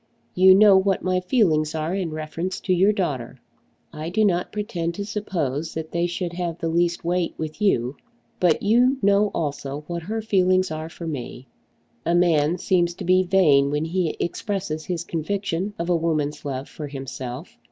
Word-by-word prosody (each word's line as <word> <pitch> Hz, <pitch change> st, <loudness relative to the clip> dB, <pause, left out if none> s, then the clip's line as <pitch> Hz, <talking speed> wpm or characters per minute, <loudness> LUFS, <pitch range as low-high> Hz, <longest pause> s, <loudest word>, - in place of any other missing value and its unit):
You 185 Hz, +1 st, +7 dB
know 200 Hz, -1 st, +7 dB
what 190 Hz, 0 st, +1 dB
my 185 Hz, 0 st, +1 dB
feelings 170 Hz, -7 st, +1 dB
are 160 Hz, +2 st, -2 dB
in 190 Hz, -3 st, -1 dB
reference 155 Hz, +4 st, -4 dB
to 185 Hz, -, +1 dB
your 190 Hz, +4 st, +4 dB
daughter. 135 Hz, -, -3 dB, 0.5 s
I 155 Hz, +1 st, -5 dB
do 215 Hz, +4 st, +2 dB
not 180 Hz, -3 st, 0 dB
pretend 180 Hz, -6 st, -3 dB
to 200 Hz, -, -4 dB
suppose 165 Hz, -8 st, -3 dB
that 160 Hz, 0 st, -5 dB
they 170 Hz, +1 st, 0 dB
should 175 Hz, 0 st, -4 dB
have 175 Hz, -2 st, -3 dB
the 165 Hz, -, -2 dB
least 170 Hz, +1 st, 0 dB
weight 175 Hz, 0 st, 0 dB
with 155 Hz, +5 st, -6 dB
you. 130 Hz, -, +1 dB, 0.4 s
But 175 Hz, -4 st, +2 dB
you 245 Hz, +6 st, +4 dB
know 200 Hz, +1 st, +4 dB
also 145 Hz, -1 st, -3 dB
what 170 Hz, +1 st, -4 dB
her 215 Hz, +7 st, -3 dB
feelings 185 Hz, -3 st, +2 dB
are 155 Hz, +1 st, -5 dB
for 170 Hz, -, -9 dB
me. 130 Hz, -4 st, -6 dB, 0.6 s
A 170 Hz, +1 st, +1 dB
man 170 Hz, -2 st, +3 dB
seems 175 Hz, -1 st, +1 dB
to -, -, -7 dB
be 185 Hz, +1 st, +4 dB
vain 170 Hz, -7 st, +4 dB
when 150 Hz, +2 st, -1 dB
he 170 Hz, -1 st, -1 dB
expresses 175 Hz, -4 st, -3 dB
his 175 Hz, -2 st, -3 dB
conviction 190 Hz, +3 st, -3 dB
of 170 Hz, -, -3 dB
a 175 Hz, -, +2 dB
woman's 155 Hz, -3 st, -1 dB
love 135 Hz, -1 st, -4 dB
for 150 Hz, -, -7 dB
himself. 135 Hz, -, -7 dB
170 Hz, 180 wpm, -23 LUFS, 155-190 Hz, 0.6 s, You